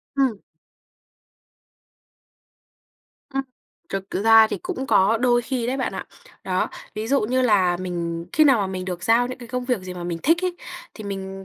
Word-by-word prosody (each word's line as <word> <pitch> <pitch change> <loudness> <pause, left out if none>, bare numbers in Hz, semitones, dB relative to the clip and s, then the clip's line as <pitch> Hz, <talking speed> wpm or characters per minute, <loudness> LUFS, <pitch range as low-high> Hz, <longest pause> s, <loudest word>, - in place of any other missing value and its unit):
Ừm. 265 -6 +1 3.0
Ừm, 270 - +1 0.5
thực 195 0 -5
ra 225 +2 +6
thì - - -3
cũng 360 -8 -4
có 215 -4 +4
đôi 240 -1 +3
khi 245 -1 -2
đấy 255 +2 -1
bạn 260 - -2
ạ. - - -5 0.4
Đó, - - 0 0.3
ví 215 +1 -3
dụ 275 +2 +3
như 255 +4 +1
là 190 -7 +3
mình 170 -2 -4
khi 310 - +5
nào 270 -5 +5
mà 200 - 0
mình 185 -1 -4
được 180 -2 -5
giao 230 +4 +3
những 255 +1 -7
cái 240 -2 -11
công 250 0 -3
việc 250 -2 0
gì 185 -1 -7
mà 175 -1 -6
mình 170 -1 -3
thích 330 +4 +4
ấy, 360 -1 -1 0.4
thì 215 - -9
mình 195 -1 -6
225 Hz, 185 wpm, -23 LUFS, 190-255 Hz, 3.0 s, ra